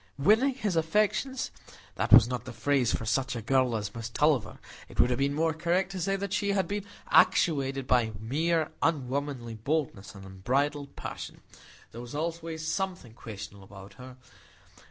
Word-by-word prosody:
Winning 220 - +4
his 210 -8 -2
affections? 210 +10 0 0.4
That - - -2
was 115 - +9
not 125 0 -4
the 130 - -7
phrase 125 +2 +1
for 115 - -2
such 130 +3 0
a 115 - -4
girl 130 0 +2
as 105 -2 -3
Miss 115 0 -5
Tulliver; 140 -3 +1 0.3
it - - -13
would 125 - +5
have 125 - 0
been 140 +1 +1
more 160 +1 +1
correct 175 +4 0
to 190 - -5
say 195 +3 0
that 195 0 -4
she 200 0 +1
had 190 -3 +1
been 205 +1 -3 0.3
actuated 135 -4 +3
by 120 -3 +2
mere 160 +9 0
unwomanly 140 -5 -1
boldness 115 -4 -3
and 95 -1 -11
unbridled 140 +10 -1
passion. - - -7 0.5
There 115 - -8
was 120 +3 -8
always 165 0 -3
something 185 - -3
questionable 100 -3 -9
about 95 0 -12
her. 130 0 -11
140 Hz, 170 wpm, -29 LUFS, 120-165 Hz, 0.5 s, was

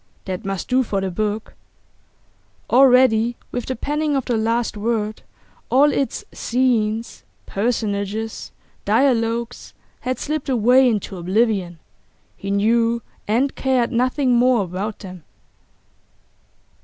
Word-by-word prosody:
That 190 +3 -4
must 195 -2 -4
do 255 +1 +3
for 210 -5 -1
the 190 -1 -2
book. 210 +3 -3 1.2
Already, 245 -3 +5
with 245 -1 -4
the 260 - -2
penning 295 +4 -1
of 270 - -1
the 240 - 0
last 230 +1 0
word, 215 0 -2 0.5
all 285 +3 +5
its 270 -4 -2
scenes, 230 -3 0 0.2
personages, 215 0 -2 0.3
dialogues 235 -2 0 0.2
had 255 +1 -3
slipped 300 -2 -3
away 250 +1 +4
into 205 -4 -3
oblivion; 185 -1 0 0.6
he 195 - -7
knew 230 +3 +2 0.2
and 250 +6 +1
cared 260 -3 0
nothing 255 +2 +1
more 245 -2 +3
about 195 +4 -4
them. 185 -4 -10
230 Hz, 115 wpm, -21 LUFS, 210-255 Hz, 1.2 s, Already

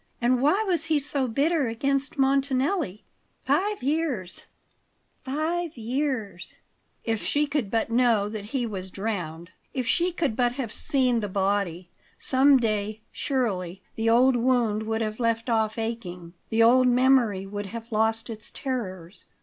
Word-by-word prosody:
And 245 +1 +2
why 310 +10 +3
was 345 -5 0
he 320 -1 +2
so 280 -2 -1
bitter 280 +4 +1
against 275 +6 -1
Montanelli? 270 - +1 0.4
Five 410 -4 +1
years 275 - -2 0.8
five 315 +3 -2
years 230 -6 -3 0.5
If 225 -2 -1
she 295 +1 +1
could 285 -7 -2
but 225 +1 -1
know 230 -4 +3
that 210 -1 -6
he 245 +3 -2
was 190 -4 -5
drowned 180 -5 -4 0.2
if 255 -2 -1
she 345 +8 +2
could 310 -9 -1
but 245 0 +1
have 250 -4 -4
seen 255 -4 +2
the 205 -2 -3
body; 190 -3 -1 0.3
some 270 +1 +4
day, 215 -2 -1
surely, 195 - -2
the 225 0 0
old 250 +3 +5
wound 235 -3 +2
would 220 0 -1
have 215 +1 -4
left 230 0 0
off 220 -1 +1
aching, 180 -7 -5 0.2
the 225 +1 +3
old 250 +2 +6
memory 245 -6 +3
would 205 +1 -5
have 230 +3 -8
lost 220 +1 +1
its 220 -2 -7
terrors. 190 -9 -5
235 Hz, 150 wpm, -26 LUFS, 210-270 Hz, 0.8 s, old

